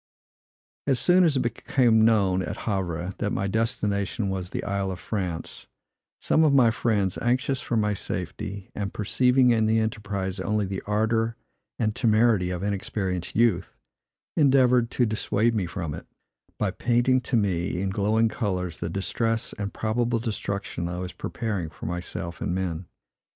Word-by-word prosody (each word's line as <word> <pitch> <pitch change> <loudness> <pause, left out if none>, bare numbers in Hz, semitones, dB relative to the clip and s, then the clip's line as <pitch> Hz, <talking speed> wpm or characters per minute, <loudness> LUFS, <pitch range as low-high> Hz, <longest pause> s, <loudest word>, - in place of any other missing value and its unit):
As 135 -3 +3
soon 180 +7 +5
as 160 -5 +3
it - - +2
became 115 -1 +2
known 100 -5 +3
at - - -4
Havre, 95 -3 -2
that 105 - 0
my 100 - -1
destination 105 0 -1
was 95 -2 -3
the - - -4
Isle 100 -1 -1
of 90 -2 -5
France, 90 -6 -4 0.5
some 160 - +3
of 145 -3 +4
my 120 -4 +6
friends, 105 -5 0
anxious 130 +2 +1
for 120 - -1
my 105 -1 +2
safety, 100 0 -5
and 100 -1 -3
perceiving 125 +4 +3
in 110 -2 +3
the 110 +1 +3
enterprise 100 -3 -2
only 105 +2 0
the 95 0 -4
ardor 110 +2 +1 0.4
and 110 -1 0
temerity 110 -5 +3
of 90 0 -3
inexperienced 100 -3 -2
youth, 105 -6 +2 0.6
endeavored 125 -5 +4
to 125 - +1
dissuade 110 +1 +1
me 100 -6 0
from 85 -4 -4
it, 80 - -8 0.5
by - - 0
painting 125 +2 +2
to 125 - -2
me, 90 -4 0
in 95 0 -1
glowing 110 +3 +2
colors, 90 -8 -2
the 85 - -3
distress 115 +5 -1
and 100 0 -2
probable 115 +2 0
destruction 100 -6 -3
I 90 - -4
was 90 0 -5
preparing 105 -8 -3
for - - -10
myself 85 -1 -5
and 90 - -1
men. 90 -2 -3
105 Hz, 160 wpm, -26 LUFS, 95-115 Hz, 0.6 s, my